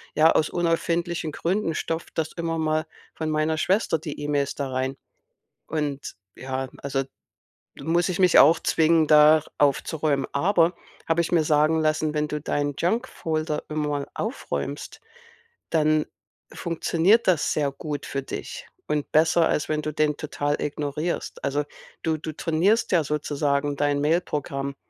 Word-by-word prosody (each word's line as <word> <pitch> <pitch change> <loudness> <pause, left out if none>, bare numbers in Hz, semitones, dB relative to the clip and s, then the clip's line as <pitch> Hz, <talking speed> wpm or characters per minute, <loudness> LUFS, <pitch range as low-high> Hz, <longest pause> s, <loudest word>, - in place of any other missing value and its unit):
ja, 155 +2 +6
aus 155 - +2
unerfindlichen 170 -1 -1
Gründen 175 -2 -1
stopft 165 +1 -4
das 160 -1 -1
immer 165 -1 -2
mal 155 0 0 0.3
von 160 -1 -3
meiner 155 +1 0
Schwester 180 -1 +1
die 155 -2 -7
E-Mails 145 -1 -1
da 140 -2 -3
rein. 130 +1 -2 0.7
Und 145 -3 -3 0.2
ja, 130 0 -4
also 135 -1 -1 0.8
muss 175 +3 +1
ich 180 - -1
mich 180 -2 +6
auch 160 +4 +7
zwingen, 160 0 +3
da 150 0 +7 0.2
aufzuräumen. 145 0 +1
Aber, 170 +2 +3 0.3
habe 165 +1 +2
ich 170 - -3
mir 165 -3 +4
sagen 155 +1 +3
lassen, 155 0 +1
wenn 150 0 0
du 150 -1 -4
deinen 145 -1 -1
Junkfolder 165 -7 -1
immer 150 -2 -2
aufräumst, 140 - -4 0.7
dann 155 -1 +2 0.5
funktioniert 170 +6 +2
das 175 -6 +2
sehr 145 -2 0
gut 145 +1 -5
für 140 - -3
dich - - -7 0.2
und 150 -1 -2
besser, 160 +1 +4
als 150 - -1
wenn 155 0 0
du 155 -1 -4
den 150 -1 +1
total 145 -1 -2
ignorierst. 150 +3 -3
Also, 145 +2 0 0.4
du 160 -1 0
du 155 +1 -6
trainierst 175 +10 +1
ja 170 -3 +4
sozusagen 145 -1 -1
dein 145 0 +1
Mailprogramm, 145 -3 -1
155 Hz, 145 wpm, -25 LUFS, 145-165 Hz, 0.8 s, auch